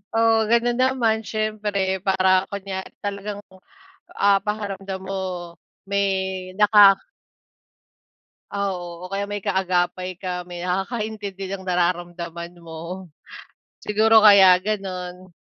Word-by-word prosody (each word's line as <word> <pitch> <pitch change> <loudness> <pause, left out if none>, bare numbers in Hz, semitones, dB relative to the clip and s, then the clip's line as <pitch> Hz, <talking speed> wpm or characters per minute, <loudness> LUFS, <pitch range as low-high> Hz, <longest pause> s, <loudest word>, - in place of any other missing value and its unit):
Oo, 225 -1 +3
ganun 235 +1 +2
naman 245 -4 +2
siyempre 210 -3 -2
para 190 -1 +3
kunya 195 -1 -4 0.2
talagang, 205 0 -4 0.8
ah, 200 0 +4
pakiramdam 195 -2 -4
mo 195 0 -3 0.6
may 200 0 +1 0.5
naka 205 -2 +7 1.5
Oo. 180 -3 -4
O - - -21
kaya 200 +1 -2
may 205 0 -3
kaagapay 185 -1 -1
ka, 180 -2 -4
may 175 0 -9
nakakaintindi 200 +1 -3
ng 190 - -11
nararamdaman 175 -1 -2
mo. 170 +3 -8 0.7
Siguro 220 +1 +4
kaya 195 -3 +8
ganun. 185 -3 -5
195 Hz, 100 wpm, -22 LUFS, 180-210 Hz, 1.5 s, kaya